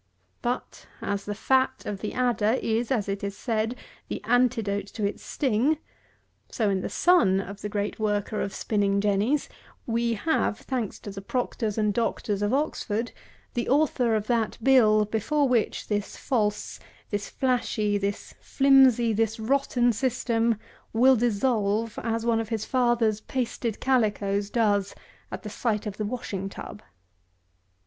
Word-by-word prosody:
But, 245 +1 -4
as 200 0 -3
the 205 - -3
fat 260 +4 +1
of 200 -2 -4
the 210 - -3
adder 245 -2 +2
is, 230 +1 -1
as 225 -7 0
is 200 0 -3
said, 225 0 -1 0.3
the - - -4
antidote 225 -4 +1
to 210 0 -3
its 200 - -3
sting; 270 +3 +1 0.7
so 215 -4 0
in 190 -1 0
the - - -3
Son 340 - +4
of 200 +1 -7
the 210 - -4
great 205 +1 -3
worker 210 0 -1
of 200 - -2
Spinning 200 -2 0
Jennies, 210 +8 +1 0.4
we 235 0 0
have, 265 -3 0
thanks 245 -6 -3
to 205 - -7
the 195 0 -7
Proctors 225 -1 -2
and 210 -1 +2
Doctors 215 -3 -1
of 205 +1 +1
Oxford, 245 -5 -1 0.4
the 240 - -2
author 255 -5 +2
of 210 -1 -1
that 230 -2 0
Bill, 215 -5 +5
before 270 +8 +1
which 240 -4 0
this 205 -1 -2
false, 210 -5 -1 0.3
this 205 -1 -2
flashy, 220 -5 0
this 200 +1 -3
flimsy, 265 -4 +5
this 225 +1 0
rotten 245 0 +2
system 235 -1 +1 0.4
will 255 +4 +6
dissolve 220 -2 0
as 230 0 -2
one 230 -1 +2
of 225 -1 -4
his 220 -2 -2
father's 240 -4 +2
pasted 240 -3 -3
calicoes 205 -5 +1
does 205 -4 +1 0.4
at - - -6
the - - -5
sight 215 -3 -1
of 205 -1 -5
the 215 - -2
washing 205 -4 -4
tub. 210 +1 -9
225 Hz, 150 wpm, -26 LUFS, 205-245 Hz, 0.7 s, will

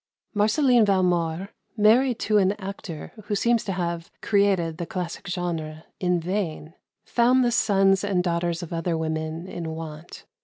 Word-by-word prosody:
Marceline 235 +3 +4
Valmore, 180 -2 +1 0.3
married 230 +4 +4
to 210 0 +2
an 195 0 +3
actor 195 -5 -7
who 210 - -1
seems 235 +2 +2
to 195 - -3
have 170 -2 -3
"created 195 -6 +1
the 170 - -3
classic 180 0 -5
genre" 165 -4 -3 0.2
in 180 -1 +1
vain, 170 -3 -3 0.3
found 250 +2 +3
the 240 - +2
sons 195 -4 +3
and 190 -3 +1
daughters 170 0 -1
of 170 - -7
other 165 0 -1
women 160 +1 -3
in 170 -3 -5
want. 160 0 -9
180 Hz, 150 wpm, -25 LUFS, 165-205 Hz, 0.3 s, Marceline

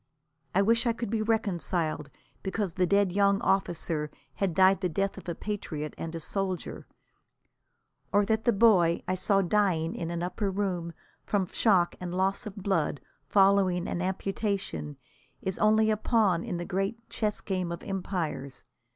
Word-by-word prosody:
I 195 - +5
wish 230 +3 +3
I 235 - +3
could 230 -2 -4
be 225 -1 0
reconciled 175 -8 -1 0.3
because 195 -2 -2
the 180 0 +1
dead 200 0 +3
young 200 +1 +3
officer 165 -5 0 0.2
had 185 +2 -1
died 190 0 +5
the 180 - 0
death 195 +4 -1
of - - -8
a 170 - -2
patriot 160 -8 -4
and 165 0 -6
a - - -3
soldier, 190 +2 -4 1.2
or 205 0 +4
that 220 +2 0
the 240 - +5
boy 195 -6 +4
I 185 - +1
saw 195 +1 +2
dying 180 -4 +1
in 165 - -4
an 170 0 -3
upper 195 +3 -2
room, 185 -4 -2 0.3
from 200 -2 0
shock 185 -2 +2
and 180 -1 -5
loss 195 +4 0
of 205 - -7
blood 185 -8 0 0.3
following 195 -3 +3
an 175 - -2
amputation, 190 - -2 0.5
is 190 -1 -2
only 220 +1 +4
a 215 - +1
pawn 210 -6 +2
in 175 - -3
the 175 - -4
great 195 +6 -2
chess 210 -2 -1
game 185 -3 -2
of 170 - -6
empires. 175 -8 -4
190 Hz, 165 wpm, -28 LUFS, 175-205 Hz, 1.2 s, I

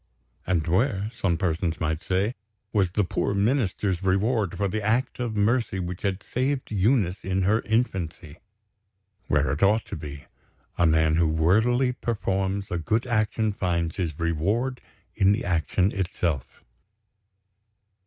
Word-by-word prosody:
And 85 -4 +1
where 100 +4 +1
(some 90 -6 0
persons 85 -2 -1
might 80 -1 -1
say) 95 +7 0 0.4
was 100 -4 +3
the 105 - +2
poor 100 +2 -1
Minister's 100 -4 +1
reward 100 0 +1
for 100 - +1
the 110 +3 -2
act 115 +6 0
of 120 -3 -2
mercy 105 -1 +1
which 90 0 -5
had 100 -1 -2
saved 130 +1 -2
Eunice 105 -2 +1
in 95 0 0
her 110 +4 +3
infancy? 90 - -2 0.9
Where 75 0 +2
it 75 - -3
ought 105 +3 +3
to - - -6
be! 75 -3 -8 0.5
A 85 - +3
man 80 0 +3
who 85 -1 +3
worthily 110 +11 +2
performs 100 -4 -2
a 90 - -1
good 110 +9 0
action 110 -2 0
finds 85 -4 -1
his 85 -6 -2
reward 100 +11 0 0.3
in 95 +1 +4
the 115 +4 -2
action 90 +3 +1
itself. 85 - -3
95 Hz, 145 wpm, -25 LUFS, 85-110 Hz, 0.9 s, in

